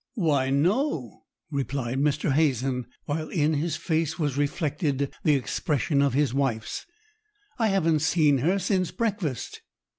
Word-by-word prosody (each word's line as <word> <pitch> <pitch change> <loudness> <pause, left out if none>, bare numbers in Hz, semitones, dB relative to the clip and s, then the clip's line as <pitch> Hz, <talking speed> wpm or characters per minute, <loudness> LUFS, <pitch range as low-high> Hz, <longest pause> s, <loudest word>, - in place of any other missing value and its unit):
"Why, 145 - +1
no!" 155 - 0 0.3
replied 135 -2 -2
Mr. 145 0 +1
Hazen, 130 -4 +1 0.2
while 155 +1 -3
in 155 -3 +1
his 155 +2 -1
face 160 -2 -1
was 145 -6 -1
reflected 145 -1 -1
the 150 - +4
expression 140 +2 0
of 140 -2 +2
his 145 -3 +2
wife's; 130 -5 -2 0.7
"I 225 - +3
haven't 165 -6 +2
seen 155 -3 +3
her 175 +9 +2
since 185 -1 0
breakfast." 205 - -3
150 Hz, 130 wpm, -26 LUFS, 135-165 Hz, 0.7 s, the